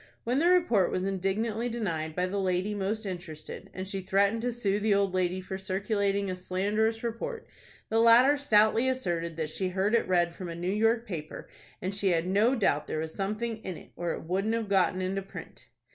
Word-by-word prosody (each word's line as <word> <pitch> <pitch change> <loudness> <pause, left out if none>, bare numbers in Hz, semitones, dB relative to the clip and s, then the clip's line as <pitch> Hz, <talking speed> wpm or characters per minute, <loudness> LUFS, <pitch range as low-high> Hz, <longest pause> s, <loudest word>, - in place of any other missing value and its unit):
When 245 +4 +1
the 335 - +3
report 335 - +4
was 185 - -1
indignantly 205 +5 -1
denied 165 -9 -3
by 180 - +1
the 195 +2 -2
lady 185 +2 0
most 210 +2 -2
interested, 175 -5 -7
and 185 +1 -6
she 195 0 -4
threatened 200 +4 +2
to 245 +1 -1
sue 205 -4 0
the 210 -1 +2
old 200 -2 +1
lady 185 0 0
for 190 +1 -6
circulating 200 +1 0
a 185 - -2
slanderous 205 +5 -1
report, 340 - -4 0.4
the 225 - +2
latter 235 +5 +7
stoutly 225 -2 +3
asserted 170 -10 -2
that 155 -1 -2
she 185 +2 -2
heard 190 +4 0
it 235 - +3
read 175 -2 +2
from 180 0 -7
a 165 - -5
New 175 +3 -2
York 225 +2 +2
paper, 160 -8 -6 0.4
and 185 +2 -2
she 200 0 -1
had 170 -2 +2
no 210 +8 +3
doubt 150 - +1
there - - -3
was 160 0 -3
something 215 +3 -2
in 190 -6 -6
it, - - -14
or 175 0 -2
it - - -6
wouldn't 195 +7 0
have 225 -3 -3
got 185 -2 +2
into 190 +1 -1
print. 195 - -11
195 Hz, 205 wpm, -29 LUFS, 185-225 Hz, 0.4 s, latter